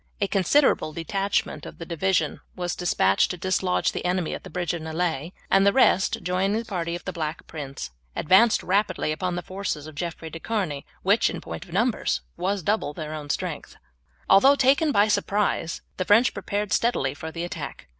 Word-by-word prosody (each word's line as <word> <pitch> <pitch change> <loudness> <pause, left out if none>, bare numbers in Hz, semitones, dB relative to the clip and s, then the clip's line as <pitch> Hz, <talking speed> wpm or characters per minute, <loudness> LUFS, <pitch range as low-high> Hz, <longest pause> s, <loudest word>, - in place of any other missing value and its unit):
A 205 - +2
considerable 195 - +2
detachment 195 +5 -1
of - - -9
the 165 - -7
division 180 +3 0
was 180 -1 -2
despatched 100 - +2
to 180 - -4
dislodge 185 0 +1
the - - -5
enemy 180 -2 0
at - - -6
the - - -9
bridge 175 -1 -2
of 170 - -4
Nieullay, 160 -1 -2 0.2
and 195 0 +5
the 200 - +5
rest, 225 -2 +3
joining 190 +3 +1
the 230 - -3
party 170 -5 -3
of 175 - -8
the - - -4
Black 155 -1 -4
Prince, 140 - -7 0.2
advanced 205 +8 +4
rapidly 195 -4 +1
upon 180 +3 -2
the 175 - -4
forces 185 -5 -4
of 155 - -9
Jeffrey 165 0 -5
de 165 - -7
Charny 175 -10 -3 0.2
which, - - +4
in - - -5
point - - -7
of - - -16
numbers, - - +1
was 195 0 -1
double 205 -7 0
their 155 0 -6
own 150 -2 -7
strength. - - -3 0.5
Although 265 +9 +7
taken 275 +3 +4
in - - +2
turn 205 - +5
by - - +1
surprise 200 -4 0 0.2
the 185 - -1
French 215 +5 +5
prepared 205 -1 -2
steadily 185 - +1
for 160 +3 -7
the 170 +1 -4
attack. 175 - -6
180 Hz, 195 wpm, -25 LUFS, 160-200 Hz, 0.5 s, Although